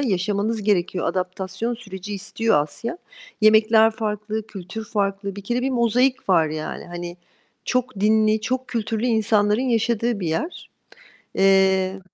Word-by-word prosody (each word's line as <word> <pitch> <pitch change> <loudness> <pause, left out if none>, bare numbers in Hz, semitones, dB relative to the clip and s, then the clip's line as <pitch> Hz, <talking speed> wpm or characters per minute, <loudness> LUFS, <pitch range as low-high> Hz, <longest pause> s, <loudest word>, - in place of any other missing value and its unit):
yaşamanız 210 -1 0
gerekiyor. 185 -3 0
Adaptasyon 190 +5 -3
süreci 205 -3 -8
istiyor 215 -2 +1
Asya. 230 - -6 0.4
Yemekler 220 +1 +6
farklı, 215 -1 -4
kültür 200 +2 -7
farklı. 200 -2 -2
Bir 200 - -7
kere 240 +4 -1
bir 265 - 0
mozaik 250 0 +1
var, 165 -4 +4
yani. 155 0 -5
Hani, 175 0 -7 0.5
çok 255 -5 -1
dinli, 215 +1 +3
çok 255 +3 -2
kültürlü 225 0 -2
insanların 215 -1 +2
yaşadığı 235 -2 0
bir 170 - -2
yer. 310 - -4 0.7
Eee 190 0 +3
210 Hz, 130 wpm, -22 LUFS, 190-230 Hz, 0.7 s, Yemekler